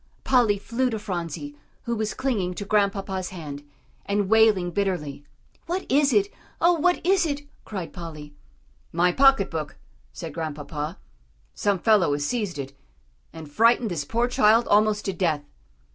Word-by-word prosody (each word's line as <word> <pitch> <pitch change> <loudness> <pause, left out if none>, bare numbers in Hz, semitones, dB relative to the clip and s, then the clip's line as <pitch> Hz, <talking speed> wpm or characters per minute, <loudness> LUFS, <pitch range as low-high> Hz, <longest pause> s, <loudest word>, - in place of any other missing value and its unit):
Polly 235 -6 +3
flew 235 +5 -1
to 225 - -3
Phronsie, 170 -8 -5 0.3
who 235 -1 -2
was 215 -1 -2
clinging 215 -9 -1
to 205 - -5
Grandpapa's 195 -2 0
hand, 150 -6 -7 0.4
and 200 -1 -1
wailing 215 -5 +4
bitterly. 170 -8 -2 0.4
"What 360 +3 -2
is 280 +1 +4
it? 205 -3 +3 0.3
Oh! 345 +1 +5
what 350 +1 +1
is 380 0 +4
it?" 290 -3 -2 0.2
cried 190 -6 -6
Polly. 155 -4 -9 0.6
"My 175 +2 +3
pocket 270 -3 +4
book," 155 -3 -5 0.3
said 165 -4 -7
Grandpapa; 150 +1 -5 0.6
"some 205 -2 0
fellow 190 -6 +3
has 145 0 -1
seized 205 -5 -2
it, 135 -1 -6 0.6
and 160 -2 -9
frightened 230 +6 +3
this 160 -4 -2
poor 235 +11 0
child 230 -1 +4
almost 210 0 +3
to 195 - -1
death." 165 -5 0
200 Hz, 150 wpm, -25 LUFS, 165-230 Hz, 0.6 s, Oh